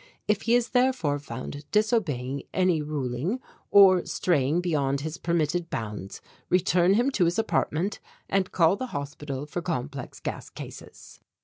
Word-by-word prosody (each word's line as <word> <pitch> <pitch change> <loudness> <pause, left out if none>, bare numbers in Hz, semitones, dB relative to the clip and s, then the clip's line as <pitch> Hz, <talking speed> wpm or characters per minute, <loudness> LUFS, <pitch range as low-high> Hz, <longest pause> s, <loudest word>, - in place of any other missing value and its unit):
If 210 -1 +2
he 235 - +6
is 245 -1 +2
therefore 250 - +2
found 145 +2 -7
disobeying 155 - 0
any 185 -4 +3
ruling 150 - -2 0.3
or 190 -3 +7
straying 155 -2 +1
beyond 140 -6 0
his 160 +3 -5
permitted 170 0 0
bounds, 105 -3 -5 0.3
return 180 +1 +3
him 245 +5 +2
to 190 -9 +2
his 170 +2 +1
apartment 195 -3 0 0.3
and 190 -1 0
call 170 +1 +4
the 255 +5 -4
Hospital 140 -1 -5
for 165 +4 -4
Complex 140 -6 -4
Gas - - -5
Cases." - - -11
170 Hz, 140 wpm, -27 LUFS, 140-190 Hz, 0.3 s, or